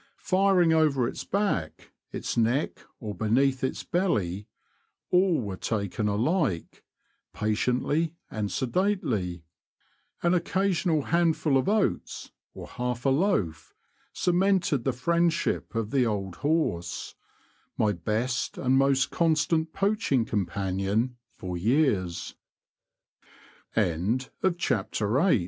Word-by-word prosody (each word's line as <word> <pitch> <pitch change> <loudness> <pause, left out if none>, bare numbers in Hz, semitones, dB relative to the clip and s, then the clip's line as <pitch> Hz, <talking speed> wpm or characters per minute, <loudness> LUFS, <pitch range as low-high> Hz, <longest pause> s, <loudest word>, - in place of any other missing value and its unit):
Firing 185 -3 +3
over 145 -6 +3
its - - -5
back, 195 - -2 0.2
its - - -4
neck, 120 +6 +1 0.2
or 105 -3 -5
beneath 130 +7 +1
its 130 - -2
belly 105 - -1 0.3
— - - -47
all 180 -2 +4
were 100 -5 -4
taken 105 +1 -2
alike, 115 - -1 0.5
patiently 125 +9 0 0.2
and 105 -2 -3
sedately. 125 - -1 0.8
An 170 +1 +3
occasional 180 -3 +1
handful 165 -3 +2
of 135 +7 +2
oats, 210 -1 -1 0.2
or - - -8
half 125 0 -4
a - - +4
loaf, 130 - 0 0.4
cemented 180 -7 +1
the 135 - +2
friendship 170 +3 0
of 115 -1 -2
the 130 -4 +3
old 95 -4 -3
horse 145 - -1 0.3
— - - -38
my 105 - +2
best 110 +7 -2
and 130 0 +2
most 135 -1 +2
constant 160 0 +1
poach 205 +2 -1
135 Hz, 95 wpm, -27 LUFS, 110-170 Hz, 0.8 s, all